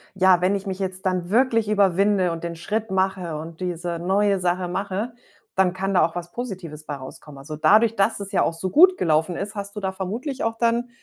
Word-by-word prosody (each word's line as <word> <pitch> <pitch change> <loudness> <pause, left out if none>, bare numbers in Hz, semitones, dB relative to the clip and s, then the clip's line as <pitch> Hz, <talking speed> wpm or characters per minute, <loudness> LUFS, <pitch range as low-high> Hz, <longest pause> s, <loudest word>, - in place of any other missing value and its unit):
„Ja, 185 -1 +4
wenn 185 +3 +2
ich 200 +1 -4
mich 190 0 -4
jetzt 190 0 -4
dann 180 -2 -1
wirklich 230 0 +2
überwinde 195 -2 +3
und 165 0 -6
den 170 -1 -4
Schritt 210 +5 -3
mache 185 -4 -1
und 160 +2 -8
diese 175 -1 -3
neue 195 +2 +2
Sache 180 0 0
mache, 195 +5 -3 0.4
dann 190 -2 +3
kann 195 +1 -2
da 180 - +5
auch 165 - -5
was 175 0 -6
Positives 185 -11 -7
bei 145 - -4
rauskommen." 135 +1 -11
Also 150 +3 -7
dadurch, 220 +7 +4
dass 200 +1 +1
es 200 -1 -7
ja - - +2
auch 165 - 0
so 185 +3 -4
gut 365 - +6
gelaufen 160 +2 +1
ist, 205 +4 -5
hast 200 0 -6
du - - -3
da 190 - -1
vermutlich 225 +9 -4
auch 225 0 -1
dann 235 +1 +1
190 Hz, 225 wpm, -23 LUFS, 175-205 Hz, 0.4 s, gut